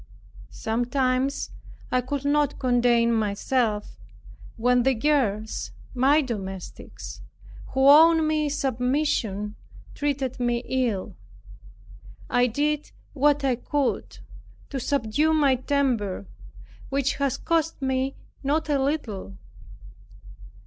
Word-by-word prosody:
Sometimes 255 +3 -1 0.4
I 255 - +2
could 275 +2 -4
not 290 0 +2
contain 240 -2 +3
myself, 215 - -1 0.6
when 245 +2 +3
the 265 +1 +2
girls, 215 - 0 0.2
my 280 +5 +4
domestics, 195 -7 -7 0.5
who 265 +1 +4
owed 320 +3 +7
me 305 -1 +1
submission, 250 -6 -1 0.4
treated 275 -3 -2
me 240 0 0
ill. 240 -7 -1 1.2
I 245 0 +4
did 295 +5 -1 0.2
what 290 0 +2
I 265 -2 +2
could 285 +1 -2 0.5
to 275 - -2
subdue 280 +5 +1
my 285 -3 +4
temper 245 - 0 0.6
which 275 0 0
has 280 -3 0
cost 325 -1 0
me 265 0 -1 0.3
not 300 +3 0
a 280 -2 +2
little. 215 - -3
260 Hz, 100 wpm, -25 LUFS, 235-285 Hz, 1.2 s, owed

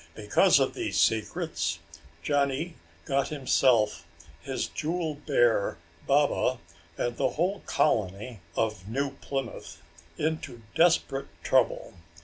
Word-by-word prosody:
Because - - +4
of - - +1
these 350 -2 -2
secrets, 115 - 0 0.5
Johnny 145 +3 0 0.3
got 140 -2 +1
himself, 130 -6 +2 0.4
his - - -2
jewel 165 0 -2
bear, 120 - +1 0.3
Baba, 140 -2 +2 0.4
and 120 0 -2
the - - +2
whole 185 +5 -1
colony 110 -2 0 0.2
of 110 -4 -1
New 135 +5 -1
Plymouth 135 -3 -5 0.4
into 155 -7 -3
desperate 165 -5 +2 0.2
trouble. - - +2
135 Hz, 105 wpm, -28 LUFS, 115-155 Hz, 0.5 s, Because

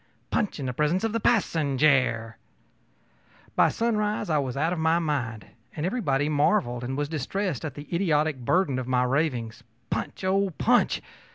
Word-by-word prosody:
punch 210 -7 -1
in 140 - -3
the 125 - -2
presence 150 - +1
of 225 -1 0
the 230 - +1
passenjare.ö 140 - +2 1.2
By - - +5
sunrise 210 -5 -1
I 155 - +3
was 130 -2 -3
out 160 +5 +1
of 175 - -3
my 160 +1 +3
mind, 135 -10 -2 0.3
and 150 - -2
everybody 150 - 0
marveled 145 - +1
and 130 +2 -3
was 145 0 -1
distressed 160 - -3
at 150 -5 -5
the 145 +1 -9
idiotic 155 -5 +1
burden 140 +1 +1
of 125 - -5
my 125 -1 +2
ravings 125 -4 -1 0.3
ōPunch! - - -3
oh, 195 +1 +2
punch! - - +2
150 Hz, 165 wpm, -26 LUFS, 130-185 Hz, 1.2 s, By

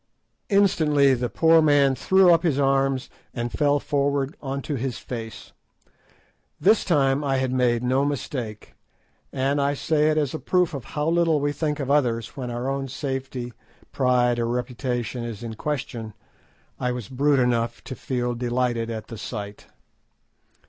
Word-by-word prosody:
Instantly 155 -9 +4
the 125 -1 -1
poor 165 +3 +4
man 145 -3 +4
threw 185 +7 +4
up 165 - +3
his 160 -6 +1
arms, 135 -1 +1 0.3
and 120 -1 -3
fell 145 -1 +2
forward 140 -1 -1
on 135 0 -3
to 145 - -4
his 130 -2 -3
face. 115 -3 -8 1.1
This 210 +3 +4
time 140 -4 +2
I 135 -2 +1
had 130 -1 0
made 125 -2 +1
no 130 +2 +2
mistake; 125 -6 -4 0.6
and—I 140 +2 0
say 155 +1 +1
it 155 - +1
as 145 -4 0
a 155 - -4
proof 180 -3 +1
of 135 -4 -6
how 150 0 -3
little 165 -2 +3
we 145 0 0
think 150 0 -2
of 140 -1 -2
others 120 -6 +1
when 125 -3 -5
our 120 +2 -3
own 135 0 -2
safety, 130 -2 -4 0.4
pride, 125 -2 +2
or 115 - 0
reputation 125 0 -3
is 115 -2 -6
in 115 -1 -5
question—I 125 -1 -6
was 125 -5 -5
brute 140 +2 +2
enough 120 -1 0
to - - -7
feel 125 -1 -2
delighted 120 -1 -1
at 110 -1 -5
the 115 - -9
sight. 105 -2 -7
135 Hz, 155 wpm, -24 LUFS, 120-145 Hz, 1.1 s, Instantly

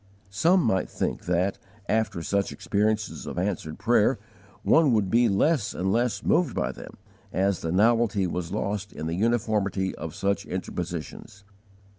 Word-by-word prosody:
Some 170 - +3
might 95 -6 +1
think - - -3
that, 90 +2 0 0.3
after 105 -6 0
such 100 +3 0
experiences 105 +1 -1
of - - -6
answered 90 -4 -2
prayer, 120 +2 +3 0.5
one 155 -6 +4
would 105 -4 +1
be 120 0 +4
less 115 +4 +1
and 95 +2 0
less 120 +2 0
moved 170 -8 +2
by - - 0
them, - - -11 0.3
as 95 0 +1
the 80 - -3
novelty 105 0 +3
was 90 -1 -3
lost 100 -1 -3
in 80 - -6
the 80 - -2
uniformity 105 -2 0
of - - -7
such 100 0 0
interpositions. 90 +2 -6
100 Hz, 150 wpm, -26 LUFS, 95-115 Hz, 0.5 s, one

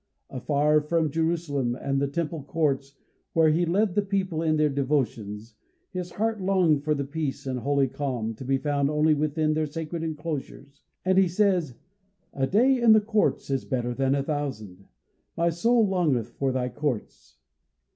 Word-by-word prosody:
Afar 145 +4 +2
from 155 0 0
Jerusalem, 160 -6 -1
and 135 0 -1
the 140 - +1
temple 160 +2 -3
courts, 140 -2 -1 0.4
where 160 -1 +4
he 170 +2 +1
led 195 +3 +1
the 205 - +2
people 190 -5 -1
in 155 -1 +1
their 155 0 +3
devotions, 120 -6 -2 0.4
his 180 -2 -5
heart 220 0 -1
longed 180 -6 +2
for 150 0 +1
the 140 - -2
peace 145 -1 -4
and 130 -2 -2
holy 140 +1 +1
calm, 125 -5 -3
to 110 - -10
be 135 +1 +1
found 140 0 0
only 155 +1 +3
within 155 +1 0
their 155 0 0
sacred 160 +2 -5
enclosures, 150 -3 -6 0.2
and 190 0 +4
he 190 - +4
says: 180 - +1 0.6
"A 135 -1 0
day 245 - +3
in 230 -2 +7
thy 215 - +7
courts 210 -8 0
is 135 -1 0
better 125 -2 -2
than 135 +2 +1
a 140 - 0
thousand." 120 -11 -5 0.5
"My 170 0 +2
soul 225 +6 +3
longeth 160 - +1
for 135 -1 -2
thy 125 -1 -1
courts." 120 - -4
150 Hz, 170 wpm, -26 LUFS, 135-170 Hz, 0.6 s, in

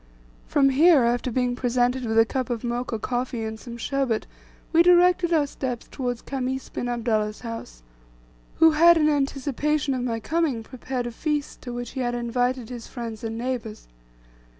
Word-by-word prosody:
From 275 -1 +4
here, 295 +1 +5
after 240 +2 +1
being 250 0 0
presented 245 0 0
with 220 -1 -1
a 225 - +7
cup 260 +2 -3
of 240 -1 -3
Mocha 240 -1 -2
coffee, 245 +1 -3
and 220 0 -5
some 235 -1 -9
sherbet, 255 -2 -1 0.5
we 330 - +7
directed 355 0 +5
our 310 -3 +3
steps 255 -4 -5
towards 245 -3 -3
Khamis 265 -1 -3
bin 245 - -4
Abdullah's 220 -3 -1
house, 225 - -8 0.7
who 325 0 +6
had, 335 +2 +6
in 305 -1 +3
anticipation 285 0 0
of 255 - -2
my 235 -2 -2
coming, 290 -3 -1
prepared 255 +1 -5
a 240 - -4
feast 295 +4 -3
to 245 - -7
which 240 -1 -5
he 265 - -6
had 240 -1 -1
invited 245 0 -1
his 240 -2 -7
friends 230 -3 -7
and 225 0 -4
neighbours. 235 -3 -4
250 Hz, 175 wpm, -25 LUFS, 235-275 Hz, 0.7 s, a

